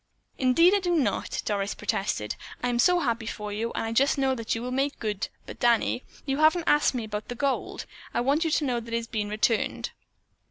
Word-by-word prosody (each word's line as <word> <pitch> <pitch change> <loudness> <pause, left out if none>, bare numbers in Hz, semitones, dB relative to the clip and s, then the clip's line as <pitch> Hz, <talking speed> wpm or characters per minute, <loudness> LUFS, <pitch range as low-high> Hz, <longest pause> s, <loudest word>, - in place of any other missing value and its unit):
"Indeed 330 +8 +5
I 405 - +4
do 355 -2 0
not," 250 -11 0
Doris 200 -1 -1
protested. 195 - -2 0.3
"I'm 245 -1 +1
so 355 +6 +4
happy 230 -5 -1
for 210 -2 -5
you, 225 +3 -2
and - - -2
I 225 - -2
just 275 +6 +3
know 270 -1 +2
that 230 -3 -2
you 225 - -4
will 250 - -3
make 275 +2 0
good, 210 -2 -2 0.2
but, - - -9
Danny, 240 +1 +2 0.2
you 270 -1 -1
haven't 315 +3 +4
asked 295 -3 +3
me 240 - -2
about 210 -1 -5
the 245 - -5
gold. 275 +2 -2 0.3
I - - -1
want 280 +6 +2
you 325 - +1
to 305 -1 +1
know 245 -3 0
that 230 0 -5
it - - +3
has 230 - -3
been 215 -2 -3
returned." 215 +1 0
240 Hz, 225 wpm, -27 LUFS, 220-280 Hz, 0.3 s, Indeed